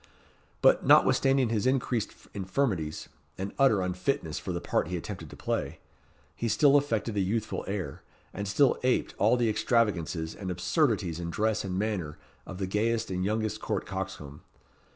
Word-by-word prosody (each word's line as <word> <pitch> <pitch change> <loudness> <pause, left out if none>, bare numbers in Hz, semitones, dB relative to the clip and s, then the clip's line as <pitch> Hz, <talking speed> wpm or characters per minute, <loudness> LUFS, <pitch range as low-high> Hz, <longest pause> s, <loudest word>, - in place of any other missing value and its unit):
But, - - +5
notwithstanding 135 -3 +4
his 115 +1 0
increased 125 -4 0 0.2
infirmities, 95 - -2 0.3
and 95 +1 -4
utter 110 -9 +4
unfitness 90 - -2
for 95 - -5
the 85 - -2
part - - 0
he 90 +1 -3
attempted 85 -3 -7
to - - -11
play, - - -3 0.6
he 115 - -2
still 145 +4 +4
affected 115 -6 +1
a - - +1
youthful 105 +4 -1
air, 100 -2 -4 0.3
and 100 +1 -4
still 130 +8 +3
aped 125 0 +1
all 125 - +4
the 120 -1 +2
extravagances 95 -8 0
and 95 -3 -6
absurdities 90 - 0
in 85 -1 -4
dress 110 +4 0
and 95 -1 -3
manner 95 -8 -2 0.3
of 95 - -7
the 95 - -2
gayest 110 +3 0
and 90 0 -1
youngest 110 +1 -1
court - - -2
coxcomb. 70 0 -6
105 Hz, 160 wpm, -28 LUFS, 90-115 Hz, 0.6 s, But